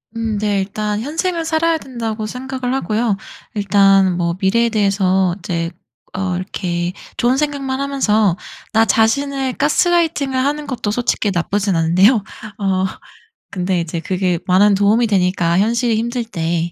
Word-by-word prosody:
음 225 -2 -2
네 205 -1 0
일단 210 +2 -3
'현생을 330 +6 -2
살아야 325 0 +1
된다.'고 230 -6 -5
생각을 255 +2 -4
하고요. 225 -5 0 0.4
일단 195 -3 +4
뭐 170 -1 0
미래에 230 +5 +2
대해서 190 -4 +1
이제 170 -2 -3 0.4
어 185 -1 -2
이렇게 180 -2 -3 0.2
좋은 245 +2 +2
생각만 275 -2 -2
하면서 220 -9 +1 0.3
나 225 0 +4
자신을 265 +5 +1
가스라이팅을 305 -2 +1
하는 290 +3 -1
것도 245 -6 -2
솔직히 225 -2 0
나쁘진 195 +2 0
않은데요. 185 +8 +4 0.4
어 190 -2 +1 0.7
근데 185 -1 -1
이제 165 0 -4
그게 180 0 0
많은 195 +2 +4
도움이 210 +4 +3
되니까 180 -4 +1
현실이 230 +3 +2
힘들 235 +2 -1
때 170 -5 -2
210 Hz, 310 characters per minute, -18 LUFS, 190-255 Hz, 0.7 s, 일단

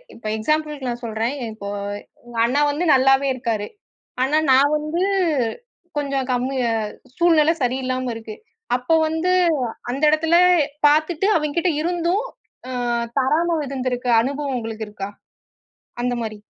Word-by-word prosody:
இப்ப 230 - -16
எக்ஸாம்பிள்கு 300 +3 -1
நான் 240 0 -5
சொல்றன். 225 +4 -2 0.2
இப்போ 200 -2 -7 0.6
உங்க 240 -1 -10
அண்ணா 275 +5 +1
வந்து 325 +5 -2
நல்லாவே 270 +1 +4
இருக்காரு. 225 -4 -2 0.6
ஆனா 285 +4 +2
நான் 275 +3 +5
வந்து 305 +3 -3 1.0
கொஞ்சம் 275 -3 -1
கம்மிய 255 +1 -1 0.5
சூழ்நில 325 -2 +4
சரியில்லாம 255 0 -1
இருக்கு. 220 -1 -8 0.4
அப்ப 250 +5 -5 0.2
வந்து 320 +3 0 0.6
அந்த 270 +3 -4
இடத்துல 320 +2 +2 0.5
பாத்துட்டு 310 +5 +2
அவிங்கிட்ட 320 +4 0
இருந்தும், 350 +4 0 0.5
ம், 240 -1 -1
தராம 320 +6 +1
இருந்துருக்க 255 -2 -3
அனுபவம் 280 +2 -2
உங்களுக்கு 225 -2 -5
இருக்கா? 200 -1 -6 0.9
அந்த 245 0 0
மாரி. 215 -2 -5
270 Hz, 120 wpm, -21 LUFS, 240-310 Hz, 1.0 s, நான்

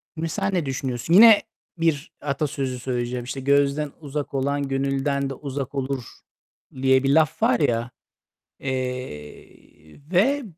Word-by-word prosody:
Mesela 165 +5 -2
ne 180 -5 0
düşünüyorsun? 130 +2 -2
Yine 215 +2 +9 0.4
bir 165 -3 0
atasözü 140 -3 -2
söyleyeceğim, 125 0 -3
işte, 130 +2 -5
"Gözden 140 +2 +2
uzak 145 -2 -5
olan 140 +1 -1
gönülden 135 +1 -1
de - - -4
uzak 140 0 -5
olur." 135 -1 -2 0.8
diye 130 0 +4
bir 135 - +1
laf 155 -2 +2
var 125 - +3
ya. 120 +1 0 0.7
Eee, 125 - -7
ve 270 +11 +3
140 Hz, 125 wpm, -23 LUFS, 130-150 Hz, 0.8 s, Yine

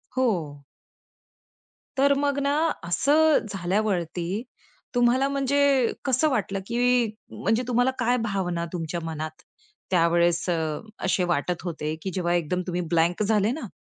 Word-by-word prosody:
हो. 170 - -1 1.3
तर 280 +1 +5
मग 285 0 0
ना 280 - +1 0.4
असं 295 - +4 0.2
झाल्यावरती, 180 -2 -1 0.7
तुम्हाला 245 +3 +3
म्हणजे 275 0 0 0.5
कसं 280 +4 +2
वाटलं? 200 -6 -1
की 245 +1 +2 0.3
म्हणजे 225 +3 0
तुम्हाला 245 +1 +2
काय 245 +1 +2
भावना 180 -5 -1
तुमच्या 170 0 -3
मनात 155 -1 -5 0.5
त्यावेळेस 170 0 +3
अ, 160 -3 -1 0.3
असे 185 0 +2
वाटत 175 +3 -2
होते, 155 -3 -3
की 190 - -4
जेव्हा 175 -1 0
एकदम 175 +1 0
तुम्ही 180 0 -1
ब्लँक 170 +5 +2
झाले 210 +1 +2
ना, 270 -5 -5
190 Hz, 125 wpm, -25 LUFS, 170-250 Hz, 1.3 s, तर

